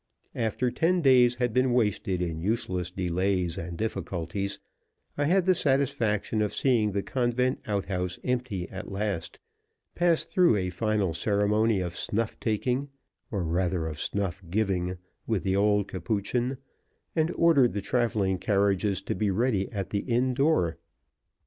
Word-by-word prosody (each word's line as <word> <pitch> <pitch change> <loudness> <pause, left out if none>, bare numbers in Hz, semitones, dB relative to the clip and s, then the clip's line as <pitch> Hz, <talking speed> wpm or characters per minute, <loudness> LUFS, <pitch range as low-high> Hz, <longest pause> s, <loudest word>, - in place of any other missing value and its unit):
After 115 +2 -1
ten 175 +4 +1
days 125 -3 +5
had 120 -2 -1
been 130 0 +2
wasted 105 -6 +1
in 80 -2 -3
useless 90 -3 -1
delays 90 -1 0
and 85 0 -6
difficulties, 95 -2 -3 0.6
I 145 - 0
had 180 +4 +3
the 185 - +5
satisfaction 135 - +1
of 105 - -1
seeing 115 -6 +2
the 100 0 -1
convent 125 0 0
outhouse 95 -3 -2
empty 125 -8 -2
at 95 +1 -7
last; 100 -4 -3 0.6
passed 175 -2 +2
through 180 - +4
a 90 -2 -1
final 105 -2 0
ceremony 105 +3 +1
of 90 -1 -4
snuff 110 +5 -2
taking, 125 +5 -1 0.4
or 100 -5 -2
rather, 85 0 0
of 75 -2 -5
snuff 100 -1 -2
giving, 95 -2 0 0.3
with 110 -4 0
the 95 -1 +1
old 105 0 +2
Capuchin, 115 +7 -2 0.6
and 160 0 +2
ordered 145 -8 +4
the 100 - -2
traveling 105 -5 0
carriages 100 -1 +1
to - - -2
be 105 +2 0
ready 100 -1 0
at 100 -2 -4
the 100 - 0
inn 125 +4 0
door. 125 - +2
105 Hz, 145 wpm, -27 LUFS, 95-125 Hz, 0.6 s, days